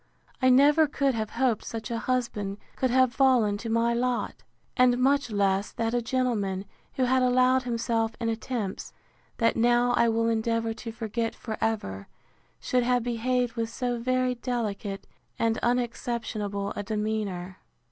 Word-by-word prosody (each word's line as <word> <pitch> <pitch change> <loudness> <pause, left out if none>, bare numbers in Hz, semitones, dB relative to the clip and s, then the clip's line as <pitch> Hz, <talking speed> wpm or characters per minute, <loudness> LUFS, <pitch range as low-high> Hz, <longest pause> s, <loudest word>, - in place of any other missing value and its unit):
I 255 - +5
never 290 +5 +6
could 280 -1 0
have 220 -2 -2
hoped 240 -3 0
such 225 0 -6
a 230 - -1
husband 230 -6 -2 0.2
could 260 - 0
have 255 0 +3
fallen 255 -7 +3
to 230 - -5
my 230 +1 +2
lot: 245 0 -1 0.3
and 250 -1 +4
much 275 +1 +2
less, 200 -1 +1
that 225 0 -1
a 245 - +1
gentleman, 225 -6 -1 0.3
who 260 - 0
had 255 +1 +3
allowed 255 +1 +4
himself 230 -2 -1
in 230 - -2
attempts, 225 -2 -3 0.4
that 230 -1 +2
now 240 +1 +3
I 235 -1 +3
will 230 0 +1
endeavour 230 0 0
to 230 +1 -7
forget 225 0 -3
for 220 -2 -5
ever, 100 - -2 0.5
should 250 - +1
have 245 0 +1
behaved 245 +1 0
with 230 -1 -2
so 245 0 -2
very 255 +1 +1
delicate 225 -5 -3 0.3
and 225 0 +1
unexceptionable 230 -4 -2
a - - -3
demeanour. 205 -4 -3
235 Hz, 155 wpm, -27 LUFS, 220-250 Hz, 0.5 s, never